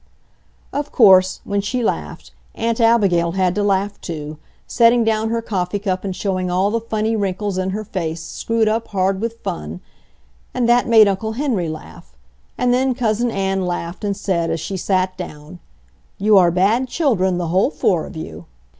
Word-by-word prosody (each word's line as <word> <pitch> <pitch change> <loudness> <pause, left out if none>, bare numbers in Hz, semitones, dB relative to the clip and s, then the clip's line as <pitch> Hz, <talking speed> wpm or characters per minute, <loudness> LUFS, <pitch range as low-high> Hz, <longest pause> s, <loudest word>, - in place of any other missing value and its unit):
Of 290 0 -3
course, 190 -5 +5
when 200 0 -1
she 245 +5 -2
laughed, 75 - -3 0.2
Aunt 230 +1 -1
Abigail 195 -8 +3
had 185 -2 +1
to 210 - -1
laugh 200 0 0
too, 155 -2 -6 0.3
setting 235 0 +4
down 220 0 0
her 230 0 -1
coffee 190 -3 -2
cup 190 -2 -2
and 190 -2 -4
showing 185 -2 -2
all 185 +3 +1
the 230 +1 -1
funny 220 0 -1
wrinkles 200 -1 -2
in 185 0 -1
her 210 +3 -3
face 170 -6 -4
screwed 220 +7 -1
up 220 +1 0
hard 190 0 0
with 230 0 -3
fun; 80 +2 -5 0.8
and 245 -2 +1
that 240 +1 +3
made 220 -2 +7
Uncle 200 +3 -1
Henry 225 - -1
laugh, 155 - -10 0.4
and 245 0 +2
then 260 0 +1
Cousin 235 -1 0
Ann 195 -3 -1
laughed 175 +2 -4
and 200 -1 -1
said, 175 -5 -1
as 165 - -1
she 195 - -5
sat 185 0 0
down, 155 -1 -9 0.6
"You 210 +1 +3
are 180 -3 +6
bad 200 +9 +2
children, 215 - +1
the 175 -2 -2
whole 190 +8 +2
four 180 - 0
of - - -10
you!" 85 - -8
195 Hz, 180 wpm, -19 LUFS, 180-225 Hz, 0.8 s, made